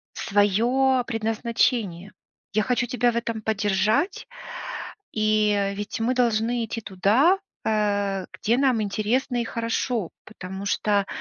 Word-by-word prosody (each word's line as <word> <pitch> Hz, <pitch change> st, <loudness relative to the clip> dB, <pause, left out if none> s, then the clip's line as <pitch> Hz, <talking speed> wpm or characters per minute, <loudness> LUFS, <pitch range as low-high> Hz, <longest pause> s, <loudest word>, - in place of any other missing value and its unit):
своё 240 Hz, +6 st, +2 dB
предназначение. 225 Hz, -4 st, -1 dB, 0.4 s
Я 215 Hz, +1 st, +2 dB
хочу 245 Hz, +1 st, 0 dB
тебя 245 Hz, -1 st, +1 dB
в -, -, -5 dB
этом 230 Hz, -2 st, -2 dB
поддержать, 215 Hz, -, +1 dB, 0.9 s
и, 215 Hz, -1 st, +2 dB
э, 200 Hz, 0 st, 0 dB
ведь 205 Hz, +2 st, -5 dB
мы 240 Hz, +3 st, +1 dB
должны 235 Hz, -1 st, +1 dB
идти 225 Hz, +1 st, -4 dB
туда, 215 Hz, -, +3 dB, 0.3 s
э, 205 Hz, -3 st, 0 dB
где 230 Hz, +3 st, 0 dB
нам 260 Hz, -4 st, +3 dB
интересно 230 Hz, +5 st, 0 dB
и -, -, -1 dB
хорошо, 230 Hz, -3 st, -2 dB
потому 190 Hz, -2 st, -8 dB
что 200 Hz, -1 st, +1 dB
220 Hz, 125 wpm, -24 LUFS, 205-240 Hz, 0.9 s, туда